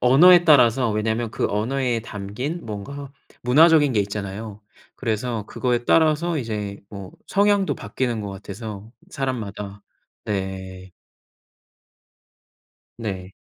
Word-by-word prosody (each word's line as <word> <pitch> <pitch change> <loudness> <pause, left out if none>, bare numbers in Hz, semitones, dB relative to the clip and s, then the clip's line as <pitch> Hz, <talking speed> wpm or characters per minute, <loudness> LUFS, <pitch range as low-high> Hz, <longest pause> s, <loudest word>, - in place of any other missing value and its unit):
언어에 175 +8 +7
따라서 130 -6 +5
왜냐면 110 +2 -1
그 - - -1
언어에 120 +3 0
담긴 110 - -5
뭔가 135 +7 -7 0.3
문화적인 150 +3 +5
게 110 - +2
있잖아요. 100 +1 -5 0.4
그래서 115 -2 -2
그거에 120 0 -1
따라서 160 +2 +3
이제 105 -5 -4
뭐 100 -3 -9 0.2
성향도 200 -1 +2
바뀌는 120 -4 -2
것 100 - -5
같아서 100 +2 -8 0.2
사람마다. 105 -6 -4 0.4
네. 95 -2 -5 2.1
네. 95 -4 -5
115 Hz, 240 characters per minute, -23 LUFS, 100-135 Hz, 2.1 s, 언어에